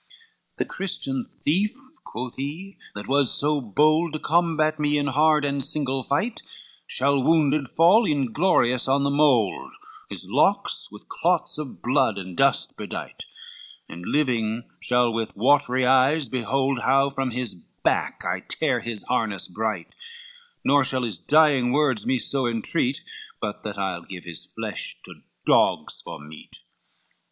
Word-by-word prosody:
LIV 455 -2 -27
"The - - -1
Christian 135 -9 -3
thief," 195 - -1 0.3
quoth 125 +2 -6
he, 160 +9 -6 0.2
"that 105 - -7
was 140 -2 +3
so 145 0 +2
bold 155 - +2
To 155 - -3
combat 160 -2 +1
me 150 0 +1
in 145 - 0
hard 150 +2 +3
and 140 -1 -1
single 135 -2 -1
fight, 215 +12 -1 0.5
Shall 140 +1 +1
wounded 150 -2 +2
fall 185 +8 +5
inglorious 135 -2 +1
on 140 +1 +2
the 140 - +1
mould, 140 - +2 0.4
His - - -3
locks - - +1
with - - -13
clods 175 -3 0
of 150 -4 -8
blood 130 -1 +2
and 95 -2 -7
dust - - +2
bedight, - - -7 0.6
And 85 +1 -9
living 120 -4 0 0.2
shall 125 -1 +2
with 115 -2 -3
watery 130 +1 +3
eyes 135 +3 +3
behold 130 +2 0
How 135 +3 +2
from 135 -1 -2
his 125 -1 -4 0.3
back - - 0
I - - -1
tear - - -1
his 115 -3 -5
harness 110 -6 -1
bright, 105 -2 -4 0.7
Nor 140 0 +4
shall 130 -1 0
his 105 -8 -2
dying 140 - +3
words 140 -6 +1
me 130 - +2
so 130 +1 +1
entreat, 125 +4 0 0.4
But 105 -1 -4
that 105 -2 -6
I'll 95 -3 -2
give 90 0 -10
his 85 -2 -8
flesh - - -4
to - - -12 0.2
dogs - - +2
for - - -8
meat." 75 +1 -9
135 Hz, 150 wpm, -24 LUFS, 120-150 Hz, 0.7 s, fall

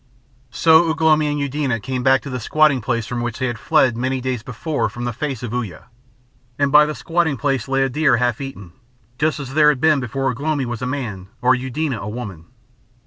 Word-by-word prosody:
So 160 +7 +4
Ugh 160 +1 -2
lomi 155 -1 +4
and 145 0 -1
Eudena 140 -4 -1
came 130 +4 -3
back 130 +1 +3
to 140 - -7
the 125 - -3
squatting 150 +2 +2
place 115 -1 -1
from 120 0 -4
which 120 -2 -3
they 130 - -1
had 120 -3 -3
fled 140 -6 +3
many 130 +2 -1
days 130 -2 -3
before 130 +6 -2
from 120 - -7
the 120 - -2
face 135 -1 -4
of 120 -1 -5
Uya; 115 -6 -5 0.7
and 140 -1 +1
by 150 +1 +7
the 155 - -4
squatting 165 -4 0
place 135 -2 -1
lay 135 0 +1
a - - +2
deer 140 -2 +2
half 120 +1 0
eaten, 100 -10 -8 0.5
just 155 0 +1
as 135 -2 -7
there 150 0 +5
had 140 -4 +1
been 155 0 +3
before 135 +1 -2
Ugh 125 - -8
lomi 145 -2 -1
was 120 -2 -5
man 125 -8 -4
or 125 +1 +4
Eudena 130 -3 -3
woman. 105 -8 -7
130 Hz, 215 wpm, -20 LUFS, 120-150 Hz, 0.7 s, by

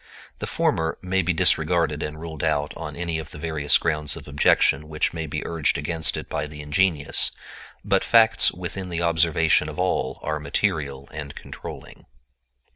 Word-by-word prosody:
The - - -4
former 80 0 0
may 95 +1 +1
be 90 0 +1
disregarded 80 -2 +2
and 75 +1 -4
ruled 80 -2 -6
out 75 +1 0
on - - -6
any 85 -2 -2
of 80 0 -7
the - - -10
various 75 -2 +2
grounds 75 -2 -1
of - - -10
objection 75 +1 +3
which 75 0 0
may 80 -1 -4
be - - -4
urged 80 -3 0
against 80 +2 -1
it - - -6
by 75 - -3
the 75 0 -10
ingenious; 75 0 +2 0.6
but 100 -2 +2
facts 115 -1 +5
within 90 +1 -6
the 85 -1 -2
observation 80 -1 +3
of - - -8
all - - 0
are 75 0 -2
material 70 -3 -1
and 75 -2 -6
controlling. - - -10
80 Hz, 170 wpm, -24 LUFS, 75-85 Hz, 0.6 s, facts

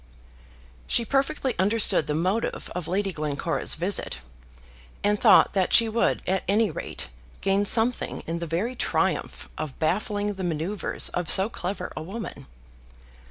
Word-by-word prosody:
She 235 - +3
perfectly 275 0 0
understood 205 -5 +3
the 150 - -1
motive 185 +8 -2
of 180 -2 -5
Lady 195 +3 -1
Glencora's 150 +1 -1
visit, 180 - -1 0.9
and 205 0 +1
thought - - +6
that 190 -2 +1
she 230 - +7
would 225 +1 0
at 190 +1 0
any 210 +3 +2
rate - - -6 0.3
gain 195 +1 +1
something 230 +4 +2
in 165 +1 -3
the 170 - -4
very 195 +11 -2
triumph - - -1
of 155 -4 -5
baffling 205 +5 -1
the 190 -1 -6
manoeuvres 170 +3 -1
of 175 -2 -3
so 190 +3 +5
clever 190 -3 -5
a - - -5
woman. 200 +7 -7
195 Hz, 145 wpm, -25 LUFS, 170-220 Hz, 0.9 s, she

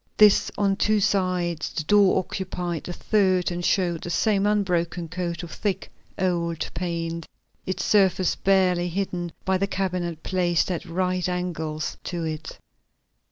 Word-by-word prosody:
This 210 -2 +6
on 200 -1 +2
two 215 0 +3
sides; 180 -5 0
the 155 - -3
door 200 +3 +5
occupied 180 -3 -3
the 175 - -5
third 185 -3 +2
and 175 0 -3
showed 175 -3 +1
the - - -5
same 200 +2 +2
unbroken 180 -4 0
coat 170 0 -4
of 170 - -7
thick, 205 -3 -3 0.3
old 170 -3 0
paint, 170 -2 -3 0.4
its 185 - -2
surface 190 -3 +3
barely 180 -2 +2
hidden 175 -1 -3
by 190 -1 +2
the 195 - +1
cabinet 180 -4 -2
placed 180 -1 +1
at 175 - -3
right 180 +1 -1
angles 160 -4 -3
to 175 -2 -3
it. 155 -1 -5
180 Hz, 145 wpm, -25 LUFS, 170-190 Hz, 0.4 s, This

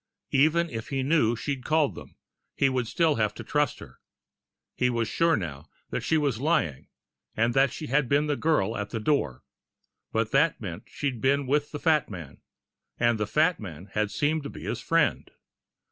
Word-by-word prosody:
Even 160 +5 +4
if 115 -2 -5
he 135 -1 -1
knew 135 -6 +3
she'd 135 +2 -4
called 155 -2 +2
them, - - -12 0.4
he 135 - +3
would 130 -3 -1
still 165 +1 +2
have 110 -2 0
to - - -7
trust 145 -4 0
her. - - -13 0.8
He 125 - +2
was 115 -2 0
sure 165 +6 +2
now 75 -6 -6 0.2
that - - -2
she 160 - +1
was 140 -7 0
lying, 90 - 0 0.5
and 115 +2 +2
that 135 +1 +4
she 155 - -6
had 135 -1 +1
been 145 +2 +3
the 150 -1 0
girl 140 -9 +1
at 100 0 -3
the 115 - -3
door 105 - 0 0.7
but 110 0 0
that 150 +3 +3
meant 90 -6 -7
she'd 135 -5 -3
been 140 +1 +2
with 145 +2 +1
the 150 - -5
fat 155 -3 +2
man. 85 -8 -9 0.6
And 120 -2 +2
the 105 - -1
fat 160 +8 +2
man 95 -2 -9
had 105 -1 0
seemed 155 +7 0
to 140 - -6
be - - -10
his - - -3
friend. - - +1
135 Hz, 190 wpm, -27 LUFS, 110-150 Hz, 0.8 s, Even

